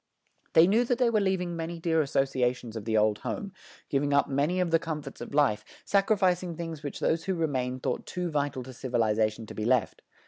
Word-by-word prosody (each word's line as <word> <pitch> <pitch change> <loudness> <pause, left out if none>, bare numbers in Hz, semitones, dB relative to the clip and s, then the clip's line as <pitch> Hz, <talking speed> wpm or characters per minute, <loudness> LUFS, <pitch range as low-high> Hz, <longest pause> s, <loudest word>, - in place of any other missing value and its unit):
They 160 - +8
knew 215 +6 +3
that 245 0 +1
they 245 -2 +3
were 215 -2 +2
leaving 185 -3 0
many 165 +1 -4
dear 165 -1 +1
associations 130 -4 0
of 110 -2 -6
the 110 -1 +1
old 105 0 +2
home, 200 -2 -5 0.3
giving 145 +1 0
up 140 - +4
many 145 +6 0
of 180 -2 0
the 165 - +4
comforts 150 -4 -6
of - - -7
life, 125 -8 +3 0.2
sacrificing 190 -4 +2
things 165 -2 -6
which 145 -2 -6
those 160 0 0
who 190 - 0
remained 130 -6 -2
thought - - -2
too 180 -2 -3
vital 145 -3 -1
to 130 +1 -10
civilization 110 -3 0
to - - -9
be 110 - -4
left. 120 -1 +1
150 Hz, 205 wpm, -28 LUFS, 125-175 Hz, 0.3 s, They